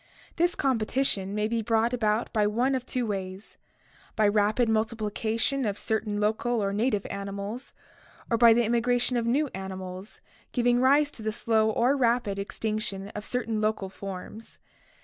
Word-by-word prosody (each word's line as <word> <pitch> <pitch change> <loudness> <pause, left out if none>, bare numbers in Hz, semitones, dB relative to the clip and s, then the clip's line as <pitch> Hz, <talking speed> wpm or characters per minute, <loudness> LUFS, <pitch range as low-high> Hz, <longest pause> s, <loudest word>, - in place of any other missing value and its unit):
This 350 +1 +2
competition 225 -5 0
may 210 0 +1
be 230 0 -1
brought 225 +2 +1
about 220 -1 0
by 210 -2 +3
one 245 +6 +1
of 255 -2 -2
two 250 -2 -1
ways: 195 -1 -5 0.6
by 215 -1 +3
rapid 210 +3 +2
multiplication 225 +3 -1
of 205 -3 -1
cer 220 0 0
tain 205 -2 -4
local 220 +3 0
or 200 -1 -1
native 210 -1 0
animals, 200 +5 -5 0.6
or 230 - +1
by 230 0 +7
the 235 +1 +4
immigration 240 +2 +1
of 235 -1 0
new 285 +6 +2
animals, 190 +1 -7 0.3
giving 245 -1 +3
rise 285 +3 +4
to 230 - -11
the 215 0 -1
slow 220 0 +1
or 240 +5 +2
rapid 235 -6 +1
extinction 200 -1 -3
of 210 - -7
certain 230 -2 -1
local 215 -2 -1
forms. 195 +3 -8
220 Hz, 160 wpm, -27 LUFS, 205-240 Hz, 0.6 s, by